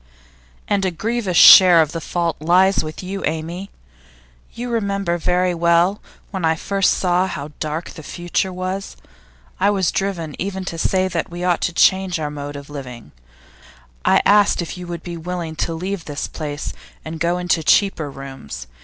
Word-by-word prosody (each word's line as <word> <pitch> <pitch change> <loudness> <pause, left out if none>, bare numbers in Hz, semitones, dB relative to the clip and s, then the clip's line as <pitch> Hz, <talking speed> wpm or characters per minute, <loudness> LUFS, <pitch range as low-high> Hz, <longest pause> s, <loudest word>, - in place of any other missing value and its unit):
'And 200 -1 +1
a 190 - +2
grievous 205 0 -2
share 180 -3 +9
of 155 -2 +3
the 165 - -5
fault 170 +1 -2
lies 180 +5 +3
with 155 +4 -7
you, 195 +1 -5
Amy. 165 +5 -3 0.8
You 245 +1 -6
remember 200 -6 -1
very 180 +2 +1
well 170 +3 +2 0.3
when 190 -3 -4
I 160 0 +3
first 195 +3 +1
saw 180 0 +1
how 145 -4 -6
dark 155 +2 -4
the 160 - -10
future 175 +4 -2
was. 185 +2 -5 0.6
I 200 +2 +3
was 195 -4 +1
driven 175 -6 -2
even 190 0 -3
to 165 -3 -5
say 185 +2 +1
that 175 -3 -3
we 175 +1 -6
ought 180 -2 +1
to - - 0
change 190 -1 +3
our 150 -1 -3
mode 145 0 -6
of 140 0 -8
living; 125 - -9 0.9
I - - +4
asked 205 0 +4
you - - -1
if 165 - -7
you 180 -1 -8
would 170 -1 -6
be 170 -1 -6
willing 170 -1 -5
to 170 - -1
leave 185 +1 -4
this 145 0 -4
place 150 -2 -5 0.3
and 160 +1 -6
go 170 +2 +1
into 175 -2 0
cheaper 160 -3 +2
rooms. 135 - -9
175 Hz, 180 wpm, -20 LUFS, 160-190 Hz, 0.9 s, share